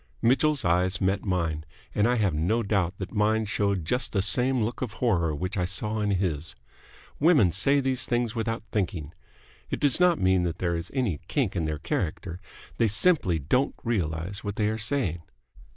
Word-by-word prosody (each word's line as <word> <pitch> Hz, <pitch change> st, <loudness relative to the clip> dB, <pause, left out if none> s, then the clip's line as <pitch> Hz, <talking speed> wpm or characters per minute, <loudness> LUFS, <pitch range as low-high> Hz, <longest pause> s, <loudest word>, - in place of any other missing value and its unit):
Mitchell's 140 Hz, +2 st, +2 dB
eyes 90 Hz, +3 st, +2 dB
met 95 Hz, +1 st, 0 dB
mine, 85 Hz, -5 st, -1 dB, 0.3 s
and 105 Hz, +2 st, +2 dB
I 125 Hz, -, +2 dB
have 100 Hz, -7 st, +1 dB
no 90 Hz, +10 st, 0 dB
doubt 95 Hz, -3 st, 0 dB
that 95 Hz, -, -6 dB
mine 110 Hz, +1 st, +2 dB
showed 100 Hz, -4 st, -1 dB
just 125 Hz, +10 st, -1 dB
the 95 Hz, -3 st, +2 dB
same 125 Hz, +5 st, +2 dB
look 115 Hz, +3 st, -4 dB
of 120 Hz, -6 st, -3 dB
horror 85 Hz, -11 st, +1 dB
which 90 Hz, +7 st, -4 dB
I 90 Hz, -, +1 dB
saw 105 Hz, +4 st, -1 dB
in 105 Hz, -, 0 dB
his. 85 Hz, -5 st, -1 dB, 0.6 s
Women 145 Hz, -, +5 dB
say 135 Hz, -, +3 dB
these 135 Hz, -1 st, 0 dB
things 120 Hz, -2 st, 0 dB
without 115 Hz, -1 st, -2 dB
thinking. 90 Hz, -7 st, -2 dB, 0.6 s
It -, -, -3 dB
does 145 Hz, 0 st, +2 dB
not 180 Hz, -2 st, +4 dB
mean 95 Hz, 0 st, +3 dB
that 85 Hz, -2 st, -2 dB
there 85 Hz, -1 st, -1 dB
is 85 Hz, +1 st, -5 dB
any 115 Hz, -, 0 dB
kink -, -, -1 dB
in 85 Hz, -, -1 dB
their 75 Hz, -1 st, -2 dB
character. 85 Hz, +3 st, -3 dB, 0.4 s
They 115 Hz, -, +3 dB
simply 110 Hz, -, +2 dB
don't 105 Hz, -, 0 dB
realize 95 Hz, -3 st, -2 dB
what 100 Hz, -1 st, -4 dB
they 105 Hz, 0 st, +1 dB
are 110 Hz, +1 st, -3 dB
saying. 110 Hz, -, -1 dB
100 Hz, 185 wpm, -26 LUFS, 90-120 Hz, 0.6 s, Women